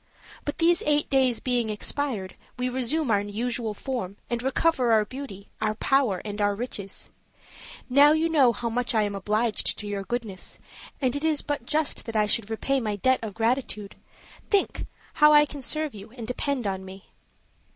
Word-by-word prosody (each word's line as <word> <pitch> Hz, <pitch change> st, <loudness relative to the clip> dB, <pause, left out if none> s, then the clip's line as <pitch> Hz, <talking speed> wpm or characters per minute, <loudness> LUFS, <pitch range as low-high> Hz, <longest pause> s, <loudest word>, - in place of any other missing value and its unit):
But 290 Hz, 0 st, -3 dB
these 340 Hz, +1 st, +3 dB
eight 295 Hz, 0 st, +2 dB
days 260 Hz, -3 st, +3 dB
being 245 Hz, -3 st, 0 dB
expired, 215 Hz, -2 st, -3 dB, 0.2 s
we 250 Hz, 0 st, -1 dB
resume 260 Hz, +2 st, 0 dB
our 200 Hz, -1 st, +3 dB
usual 220 Hz, +2 st, -3 dB
form 230 Hz, -7 st, -4 dB, 0.2 s
and 235 Hz, -1 st, 0 dB
recover 265 Hz, -1 st, +2 dB
our 215 Hz, -1 st, +4 dB
beauty, 250 Hz, -6 st, -8 dB
our 215 Hz, 0 st, +1 dB
power, 245 Hz, -6 st, +2 dB
and 205 Hz, 0 st, -4 dB
our 205 Hz, 0 st, +2 dB
riches. 205 Hz, -4 st, -6 dB, 0.8 s
Now 280 Hz, +3 st, +7 dB
you 315 Hz, +1 st, +3 dB
know 285 Hz, -7 st, +5 dB
how 235 Hz, +1 st, -4 dB
much 245 Hz, +1 st, -1 dB
I 215 Hz, -, +4 dB
am 205 Hz, -1 st, -2 dB
obliged 210 Hz, +3 st, 0 dB
to 210 Hz, -, -6 dB
your 205 Hz, -1 st, -3 dB
goodness, 215 Hz, -3 st, -4 dB, 0.4 s
and 260 Hz, -1 st, +1 dB
it 285 Hz, -, -3 dB
is 315 Hz, -2 st, +1 dB
but 290 Hz, -5 st, -3 dB
just 310 Hz, -1 st, 0 dB
that 225 Hz, -, -5 dB
I 210 Hz, -1 st, +4 dB
should 210 Hz, +1 st, +1 dB
repay 270 Hz, +5 st, 0 dB
my 215 Hz, -4 st, -2 dB
debt 260 Hz, +6 st, +2 dB
of 215 Hz, -3 st, -6 dB
gratitude; 225 Hz, -3 st, -1 dB, 0.5 s
think 400 Hz, -2 st, +1 dB, 0.3 s
how 300 Hz, 0 st, +8 dB
I 295 Hz, 0 st, +7 dB
can 285 Hz, -1 st, -8 dB
serve 305 Hz, +3 st, -1 dB
you 205 Hz, +1 st, -10 dB
and 230 Hz, -, -5 dB
depend 250 Hz, 0 st, -2 dB
on 190 Hz, -1 st, -2 dB
me." 190 Hz, +1 st, -12 dB
240 Hz, 185 wpm, -26 LUFS, 210-275 Hz, 0.8 s, how